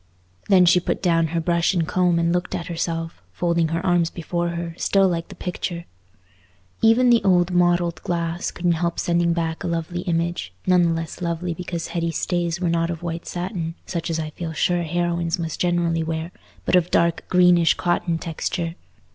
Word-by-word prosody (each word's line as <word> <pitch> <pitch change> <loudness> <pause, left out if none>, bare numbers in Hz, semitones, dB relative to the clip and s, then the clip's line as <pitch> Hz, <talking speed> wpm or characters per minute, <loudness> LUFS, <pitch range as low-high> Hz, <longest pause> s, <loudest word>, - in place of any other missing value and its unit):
Then 185 -3 +6
she 180 +1 +5
put 180 - -3
down 165 -2 +3
her 165 +2 -1
brush 170 +2 +1
and 165 -2 +1
comb 180 -2 +2
and 170 0 +2
looked 180 +1 -1
at 170 - -4
herself, 165 - -3
folding 170 - +1
her 165 +3 -2
arms 175 -2 +3
before 170 0 -3
her, 170 0 -4
still 195 +2 +3
like 170 -2 -2
the 195 - -11
picture. 175 -1 -4 1.0
Even 235 +2 +5
the 235 -3 +4
old 180 -2 +3
mottled 175 -2 +2
glass 170 0 -2
couldn't 175 0 0
help 170 -1 -1
sending 170 0 +1
back 165 0 -2
a - - -2
lovely 170 +1 -2
image, 170 - -2
none 180 -1 +4
the 170 - +3
less 165 +1 -5
lovely 170 0 -2
because 170 -1 -5
Hetty's 170 -2 -2
stays 175 -1 -1
were 180 - 0
not 165 0 +1
of 170 -1 -5
white 165 -1 -4
satin—such 175 -2 -4
as 165 - -1
I 155 -1 -4
feel 165 +1 -5
sure 175 +2 +1
heroines 170 0 -1
must 165 -3 -4
generally 175 -2 +1
wear—but 160 +3 -4
of 175 -2 +4
a - - -20
dark 170 -1 +1
greenish 180 -2 +5
cotton 175 -1 0
texture. 165 0 -3
170 Hz, 185 wpm, -23 LUFS, 165-175 Hz, 1.0 s, Then